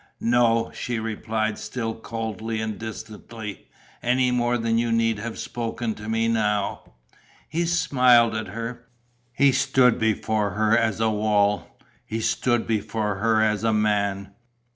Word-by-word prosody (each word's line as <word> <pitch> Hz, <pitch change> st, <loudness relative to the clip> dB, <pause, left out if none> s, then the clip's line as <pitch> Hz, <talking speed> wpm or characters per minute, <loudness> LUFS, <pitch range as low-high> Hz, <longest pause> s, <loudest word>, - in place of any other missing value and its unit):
"No," 115 Hz, -1 st, +2 dB
she 120 Hz, -1 st, -3 dB
replied, 110 Hz, 0 st, -2 dB
still 115 Hz, 0 st, -4 dB
coldly 110 Hz, -1 st, -4 dB
and 110 Hz, -2 st, -4 dB
distantly. 110 Hz, -2 st, -8 dB, 0.3 s
"Any 125 Hz, +1 st, +2 dB
more 120 Hz, 0 st, +1 dB
than 115 Hz, 0 st, +1 dB
you 120 Hz, 0 st, 0 dB
need 115 Hz, -1 st, +1 dB
have 115 Hz, +1 st, -5 dB
spoken 115 Hz, -1 st, -3 dB
to 105 Hz, +1 st, -8 dB
me 115 Hz, 0 st, +1 dB
now." 105 Hz, -3 st, -1 dB, 0.5 s
He 170 Hz, +2 st, -1 dB
smiled 125 Hz, -8 st, +4 dB
at 110 Hz, -1 st, -3 dB
her. 115 Hz, +4 st, -6 dB, 0.4 s
He 140 Hz, +3 st, +4 dB
stood 130 Hz, -2 st, +3 dB
before 110 Hz, -2 st, 0 dB
her 110 Hz, +1 st, +3 dB
as 115 Hz, -2 st, +1 dB
a 110 Hz, 0 st, +2 dB
wall. 105 Hz, -1 st, +1 dB, 0.3 s
He 110 Hz, -, -4 dB
stood 120 Hz, +1 st, +1 dB
before 105 Hz, -2 st, -1 dB
her 110 Hz, +1 st, +2 dB
as 105 Hz, 0 st, +1 dB
a 115 Hz, -1 st, +2 dB
man. 100 Hz, -2 st, 0 dB
115 Hz, 140 wpm, -24 LUFS, 110-120 Hz, 0.5 s, smiled